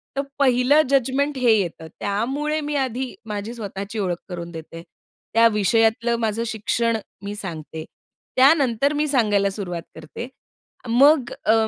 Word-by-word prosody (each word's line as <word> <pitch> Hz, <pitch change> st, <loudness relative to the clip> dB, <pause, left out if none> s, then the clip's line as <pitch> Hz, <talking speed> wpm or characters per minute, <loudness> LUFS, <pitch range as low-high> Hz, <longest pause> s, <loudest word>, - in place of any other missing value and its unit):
तर 275 Hz, -, +1 dB, 0.2 s
पहिलं 260 Hz, +2 st, +4 dB
जजमेंट 275 Hz, +2 st, +1 dB
हे 250 Hz, -2 st, +4 dB
येतं. 170 Hz, -4 st, -3 dB
त्यामुळे 270 Hz, +10 st, -1 dB
मी 295 Hz, 0 st, -3 dB
आधी 255 Hz, 0 st, -4 dB
माझी 210 Hz, +2 st, -4 dB
स्वतःची 205 Hz, -1 st, -6 dB
ओळख 180 Hz, -4 st, -1 dB
करून 170 Hz, -1 st, -6 dB
देते. 165 Hz, 0 st, -9 dB, 0.5 s
त्या 230 Hz, +1 st, +6 dB
विषयातलं 225 Hz, +3 st, +2 dB
माझं 225 Hz, 0 st, -1 dB
शिक्षण 225 Hz, +1 st, 0 dB, 0.3 s
मी 200 Hz, +1 st, -4 dB
सांगते. 160 Hz, -5 st, -6 dB, 0.5 s
त्यानंतर 275 Hz, -1 st, +4 dB
मी 300 Hz, +1 st, 0 dB
सांगायला 210 Hz, -8 st, +2 dB
सुरुवात 185 Hz, -4 st, -4 dB
करते. 160 Hz, +9 st, -8 dB, 0.6 s
मग 265 Hz, +2 st, +5 dB
अ, 220 Hz, -, +5 dB
230 Hz, 135 wpm, -22 LUFS, 200-265 Hz, 0.6 s, त्या